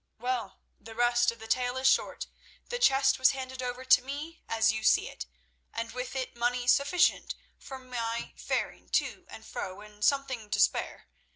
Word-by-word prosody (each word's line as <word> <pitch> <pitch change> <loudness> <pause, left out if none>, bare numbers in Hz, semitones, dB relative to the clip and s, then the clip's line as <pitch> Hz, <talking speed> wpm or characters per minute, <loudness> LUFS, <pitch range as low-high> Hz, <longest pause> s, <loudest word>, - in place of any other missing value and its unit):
Well, 250 +1 -3 0.2
the 225 0 -12
rest 240 0 +3
of 230 - -12
the 225 - -10
tale 250 +2 0
is 260 0 +2
short. - - +2 0.4
The 485 - -3
chest 270 - +4
was 260 - +5
handed 260 -1 -6
over 250 +1 -4
to 260 - +6
me 290 +5 -7
as 225 0 +3
you 220 0 -4
see - - +4
it, - - -8 0.4
and 230 0 -4
with 250 +2 -5
it 260 -1 -3
money 245 +1 0
sufficient 280 +8 +3 0.2
for 265 - -8
my 235 -2 -4
faring - - -3
to - - -4
and - - -11
fro 190 +1 -6
and 210 0 -11
something 260 -6 +1
to - - -1
spare. - - +1
250 Hz, 180 wpm, -29 LUFS, 230-265 Hz, 0.4 s, to